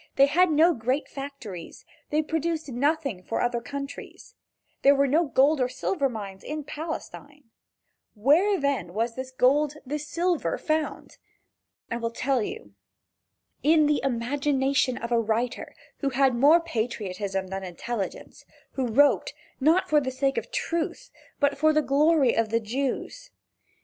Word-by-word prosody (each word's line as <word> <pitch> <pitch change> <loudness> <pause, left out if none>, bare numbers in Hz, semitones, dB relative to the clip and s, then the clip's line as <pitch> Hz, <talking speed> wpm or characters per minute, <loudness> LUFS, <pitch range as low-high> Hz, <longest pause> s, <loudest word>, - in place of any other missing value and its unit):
They 275 - +7
had 350 +6 +3
no 320 +3 +5
great 255 +4 -1
factories, 270 -11 -8 0.2
they 305 +1 +1
produced 320 -1 -2
nothing 275 - 0
for 205 - -3
other 240 -1 0
countries. 280 - -8 0.5
There 280 +1 +6
were 280 0 +3
no 310 +6 +2
gold 280 +1 +3
or 250 - +1
silver 275 +2 -1
mines 200 -5 -7
in 305 0 -5
Palestine. 295 -3 -8 0.6
Where 320 - +3
then 280 - -1
was 230 +2 0
this 260 +2 -6
gold, 280 +3 +2
this 300 +3 -4
silver 345 0 0
found? 310 0 -3 0.7
I 230 - -1
will 230 -1 -2
tell 255 +2 0
you: 435 - -6 0.9
In 310 +1 +4
the 295 0 +2
imagination 270 +1 0
of 235 - -6
a 235 - +3
writer 230 +3 -2 0.2
who 275 - 0
had 265 0 +2
more 285 +8 +6
patriotism 205 - -3
than 195 0 -4
intelligence, 195 +4 -6 0.3
and 260 -3 -1
who 220 - -6
wrote, 285 +1 +4 0.3
not 320 +7 +3
for 300 -1 +3
the 260 - -2
sake 270 +1 0
of - - -12
truth, 340 +9 -3 0.3
but 285 -1 +1
for 310 +1 +4
the 305 0 +2
glory 285 -1 +3
of 225 -1 +1
the 230 +1 +1
Jews. 270 - -4
275 Hz, 150 wpm, -26 LUFS, 235-305 Hz, 0.9 s, They